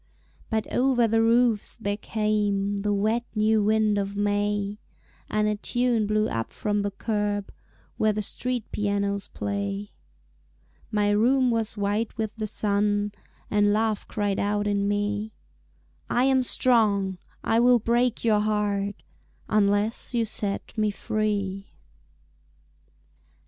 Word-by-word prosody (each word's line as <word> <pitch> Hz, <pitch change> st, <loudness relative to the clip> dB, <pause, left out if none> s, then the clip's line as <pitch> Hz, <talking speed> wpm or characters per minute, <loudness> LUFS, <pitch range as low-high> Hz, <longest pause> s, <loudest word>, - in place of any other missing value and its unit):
But 220 Hz, -1 st, 0 dB
over 245 Hz, -2 st, +3 dB
the 225 Hz, +1 st, +2 dB
roofs 230 Hz, -1 st, +2 dB
there 205 Hz, -3 st, -2 dB
came 205 Hz, -2 st, 0 dB
The 205 Hz, +1 st, -1 dB
wet 215 Hz, +4 st, +1 dB
new 215 Hz, 0 st, +3 dB
wind 215 Hz, -1 st, +2 dB
of 200 Hz, 0 st, -3 dB
May, 205 Hz, 0 st, 0 dB, 0.5 s
And 210 Hz, 0 st, +1 dB
a 210 Hz, 0 st, 0 dB
tune 240 Hz, -1 st, +1 dB
blew 215 Hz, +1 st, +1 dB
up 115 Hz, 0 st, -3 dB
from 205 Hz, -1 st, -1 dB
the 205 Hz, -, -1 dB
curb 205 Hz, 0 st, -2 dB, 0.5 s
Where 215 Hz, -, +3 dB
the 210 Hz, 0 st, -2 dB
street 250 Hz, +2 st, -2 dB
pianos 200 Hz, -1 st, -1 dB
play. 200 Hz, 0 st, -4 dB, 1.0 s
My 210 Hz, -2 st, +1 dB
room 250 Hz, +4 st, +3 dB
was 225 Hz, -1 st, -1 dB
white 205 Hz, +3 st, -1 dB
with 220 Hz, -2 st, -3 dB
the 215 Hz, -1 st, -2 dB
sun 205 Hz, 0 st, 0 dB, 0.4 s
And 205 Hz, 0 st, +3 dB
Love 220 Hz, -1 st, 0 dB
cried 205 Hz, -2 st, -1 dB
out 205 Hz, 0 st, 0 dB
in 200 Hz, -1 st, 0 dB
me, 205 Hz, +1 st, -1 dB, 0.8 s
"I 245 Hz, -, +2 dB
am 265 Hz, 0 st, +4 dB
strong, 210 Hz, -7 st, +2 dB, 0.2 s
I 225 Hz, -, +2 dB
will 245 Hz, +1 st, +6 dB
break 235 Hz, +1 st, 0 dB
your 215 Hz, -2 st, +4 dB
heart 205 Hz, -1 st, -1 dB, 0.5 s
Unless 210 Hz, +3 st, +1 dB
you 230 Hz, -1 st, +2 dB
set 205 Hz, -1 st, -2 dB
me 215 Hz, -2 st, +1 dB
free." 200 Hz, -2 st, -2 dB
210 Hz, 130 wpm, -26 LUFS, 205-220 Hz, 1.0 s, will